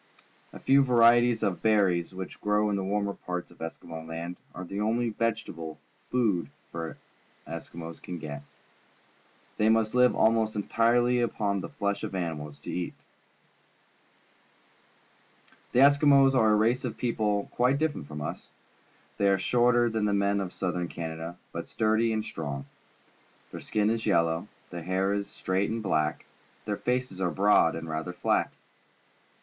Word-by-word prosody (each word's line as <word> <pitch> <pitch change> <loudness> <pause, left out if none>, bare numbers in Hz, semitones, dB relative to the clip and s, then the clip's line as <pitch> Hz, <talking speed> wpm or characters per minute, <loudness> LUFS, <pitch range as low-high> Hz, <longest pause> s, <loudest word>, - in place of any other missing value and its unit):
A - - -10
few 140 +1 +5
varieties 120 -2 +5
of 95 -4 -1
berries, 95 -6 +2
which 95 0 -8
grow 105 0 +2
in - - +1
the 95 - -2
warmer 100 +1 -1
pai'ts 90 -2 -5
of - - -19
Eskimo 80 0 -7
Land, 85 +2 -5 0.2
are 90 - -6
the 100 +3 -4
only 115 +3 +1
vegetable 105 -9 -3 0.3
food 110 -9 +1 0.2
the 80 -1 -5 0.5
Eski 85 +1 -8
mos 85 -1 -7
can 90 - -7
get. 75 -2 -6 1.2
They 105 +1 +3
must 110 -1 +2
live 125 0 +4
almost 110 -1 +2
entirely 120 +4 +2
upon 100 -4 -1
the - - -6
flesh 100 0 -2
of - - -4
animals 75 -5 -5
and - - -4
fish. 90 -1 -3 2.8
The 125 - +4
Eskimos 140 -1 +6
are 115 -4 +4
a - - +5
race 115 +4 +2
of 125 - -4
people 105 -4 0
quite 125 +3 +2
different 145 - -2
from 75 0 -6
us. - - -6 0.7
They 100 - +4
are 95 - +4
shorter 120 +4 +3
than 110 -2 0
the 105 - +1
men 100 0 +2
of 95 -2 -4
Southern 90 -2 -2
Canada, 80 +1 -6
but - - -5
sturdj' 110 +1 +1
and 110 -1 -1
strong. 70 -3 -5 0.9
Their - - -7
skin 105 0 +1
is 115 -1 -2
yellow, 85 -1 +2 0.2
their 85 - -5
hair 95 +3 0
is 100 0 -2
straight 95 +2 -1
and 110 0 -3
black, 75 -6 0 0.4
their 105 -1 -2
faces 125 -6 -2
are 90 - +2
broad 95 -1 +4
and 80 0 -6
rather 80 +2 -4
flat. - - +1
100 Hz, 155 wpm, -28 LUFS, 85-115 Hz, 2.8 s, Eskimos